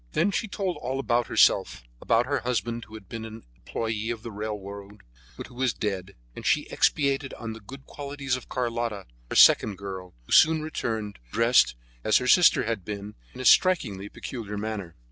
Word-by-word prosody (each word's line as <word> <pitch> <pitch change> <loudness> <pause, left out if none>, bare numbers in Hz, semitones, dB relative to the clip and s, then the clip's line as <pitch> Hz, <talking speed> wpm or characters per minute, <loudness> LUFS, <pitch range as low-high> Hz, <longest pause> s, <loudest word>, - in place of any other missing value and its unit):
Then 185 +5 +2
she 220 - -1
told 195 -3 -3
all 130 +2 -3
about 120 -3 +1
herself, - - +3 0.2
about 115 +1 +2
her 140 +2 0
husband, 120 -1 -2
who 110 - -13
had 110 -3 -11
been 115 -1 -6
an 110 0 -9
employee 110 - -3
on 115 -2 -6
the 115 - -6
railway, 100 -1 -6 0.4
but - - -6
who 125 - -15
was 125 -1 0
dead, 100 -2 -4 0.2
and - - -8
she - - +2
expatiated 140 -2 +1
on 115 -1 -6
the 110 - -10
good 135 +6 -12
qualities 140 -2 -4
of 125 - -9
Carlotta, 115 -5 -2 0.2
her - - -4
second 105 -3 +6
girl, 95 -2 -8
who - - -16
soon 160 -1 +6
returned, 110 -9 -4
dressed, 115 - +4 0.3
as 110 - +4
her 125 - -2
sister 175 +5 +6
had 110 -4 -2
been, 100 +2 -6 0.2
in 130 - -6
a - - -5
striking, 140 - +4
peculiar 105 -5 -6
manner. 100 -5 -5
115 Hz, 185 wpm, -26 LUFS, 105-130 Hz, 0.4 s, second